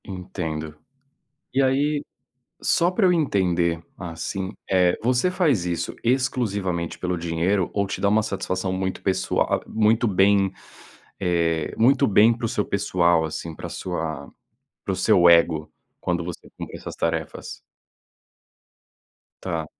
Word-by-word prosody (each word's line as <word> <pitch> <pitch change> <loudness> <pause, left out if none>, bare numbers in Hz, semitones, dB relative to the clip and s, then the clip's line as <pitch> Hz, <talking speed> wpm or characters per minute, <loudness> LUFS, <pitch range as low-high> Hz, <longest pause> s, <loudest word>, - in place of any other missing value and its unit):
Entendo. 80 -5 -5 0.8
E 135 - +3
aí, 145 +3 +1 0.6
só 170 - +3
pra 190 +2 +1
eu 180 - +5
entender, 90 - +1
assim, 90 +2 -5 0.2
eh, 90 -2 +3
você 125 +8 +2
faz 155 - +1
isso, 85 -1 -3
exclusivamente 105 -9 -1
pelo 90 0 -2
dinheiro, 85 +3 0
ou 100 -1 +1
te 95 - -5
dá 100 - +3
uma 110 +1 +3
satisfação 95 -2 -2
muito 95 0 -3
pessoa 95 - +1
a - - +1
a, - - -10
muito 110 +2 +2
bem, 95 0 +3 0.7
eh, 85 -4 0
muito 130 +4 +4
bem 110 +3 +5
para 120 - -7
o - - +1
seu 105 - -1
pessoal, 85 -4 +2
assim, 80 +1 -5
pra - - -7
sua 80 -4 -4 0.5
para - - -1
o - - -2
seu 85 0 +5
ego, 85 -2 +4 0.3
quando 85 -1 -1
você 90 -1 -8
cumpre - - -7
essas - - -8
tarefas? 80 -2 -3 1.8
Tá. 85 -4 -2
95 Hz, 140 wpm, -23 LUFS, 85-110 Hz, 1.8 s, eu